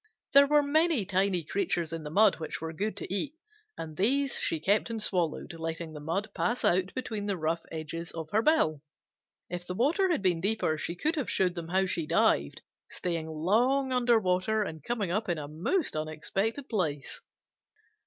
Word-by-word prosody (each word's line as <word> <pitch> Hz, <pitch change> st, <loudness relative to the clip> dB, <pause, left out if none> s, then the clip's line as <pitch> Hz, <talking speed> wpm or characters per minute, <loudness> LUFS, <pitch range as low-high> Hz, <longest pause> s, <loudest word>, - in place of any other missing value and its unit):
There 280 Hz, 0 st, +8 dB
were 295 Hz, 0 st, +4 dB
many 310 Hz, -, +2 dB
tiny 185 Hz, -2 st, +1 dB
creatures 170 Hz, -1 st, -1 dB
in 165 Hz, -, -4 dB
the 150 Hz, -, -6 dB
mud 205 Hz, +4 st, +4 dB
which 160 Hz, -, -4 dB
were 160 Hz, 0 st, -5 dB
good 200 Hz, +4 st, -3 dB
to 185 Hz, -, -5 dB
eat, 285 Hz, +9 st, -2 dB, 0.4 s
and 155 Hz, -1 st, -6 dB
these 270 Hz, -, +2 dB
she 165 Hz, -, 0 dB
kept 205 Hz, +8 st, +2 dB
and 230 Hz, -1 st, -3 dB
swallowed, 175 Hz, -6 st, -1 dB
letting 165 Hz, 0 st, -5 dB
the 150 Hz, -, -7 dB
mud 190 Hz, +8 st, -2 dB
pass 240 Hz, -, 0 dB
out 185 Hz, +1 st, +3 dB
between 220 Hz, -5 st, -3 dB
the 200 Hz, -2 st, -1 dB
rough 165 Hz, +1 st, -1 dB
edges 165 Hz, +2 st, -5 dB
of 160 Hz, -2 st, -6 dB
her 215 Hz, -, +3 dB
bill. 190 Hz, -, +2 dB, 0.7 s
If 175 Hz, 0 st, -6 dB
the 180 Hz, -, -4 dB
water 325 Hz, -, +2 dB
had 325 Hz, -, 0 dB
been 175 Hz, -3 st, +2 dB
deeper, 200 Hz, -5 st, +1 dB
she 170 Hz, +3 st, -4 dB
could 310 Hz, -, 0 dB
have 285 Hz, -, -1 dB
showed 185 Hz, -2 st, +2 dB
them 170 Hz, -2 st, -6 dB
how 190 Hz, +2 st, +2 dB
she 170 Hz, -4 st, -2 dB
dived, 70 Hz, -, +2 dB, 0.3 s
staying 170 Hz, -3 st, -3 dB
long 240 Hz, -, +1 dB
under 240 Hz, -2 st, +4 dB
water 190 Hz, +3 st, +1 dB
and 160 Hz, -6 st, -7 dB
coming 215 Hz, -5 st, -2 dB
up 210 Hz, +2 st, -1 dB
in 175 Hz, -, 0 dB
a 145 Hz, -1 st, -5 dB
most 200 Hz, -, -1 dB
unexpected 195 Hz, -, -2 dB
place. 155 Hz, -, -2 dB
185 Hz, 190 wpm, -29 LUFS, 165-225 Hz, 0.7 s, There